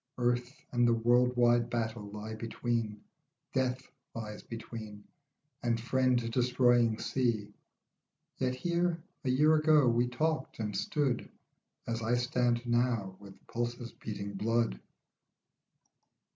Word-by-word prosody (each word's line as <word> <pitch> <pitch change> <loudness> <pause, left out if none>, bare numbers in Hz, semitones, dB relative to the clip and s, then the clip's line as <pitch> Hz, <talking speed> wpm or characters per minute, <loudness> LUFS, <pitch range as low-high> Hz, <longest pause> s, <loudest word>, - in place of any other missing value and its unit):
Earth 125 +3 0
and 120 -1 +3
the 115 - +4
world 120 +2 +3
wide 120 -1 +4
battle 110 -3 -2
lie 105 +2 -6
between, 115 -1 -2 0.5
Death 130 0 -1 0.2
lies 105 -2 -6
between, 110 -2 -8 0.6
and 115 -1 +1
friend 125 -1 +1
destroying 120 -2 +3
sea. 115 -6 -1 0.9
Yet 130 -1 0
here, 170 +3 0 0.2
a 130 - -1
year 150 +5 +5
ago, 155 -3 +5
we 120 +1 +3
talked 155 +6 -1
and 105 -2 -3
stood 130 +5 0 0.6
As 115 0 -2
I 115 +2 +1
stand 120 -1 +1
now, 120 -5 +1
with 100 -1 -14
pulses 120 0 -3
beating 100 -1 -6
blood. 115 - 0
120 Hz, 115 wpm, -31 LUFS, 115-125 Hz, 0.9 s, year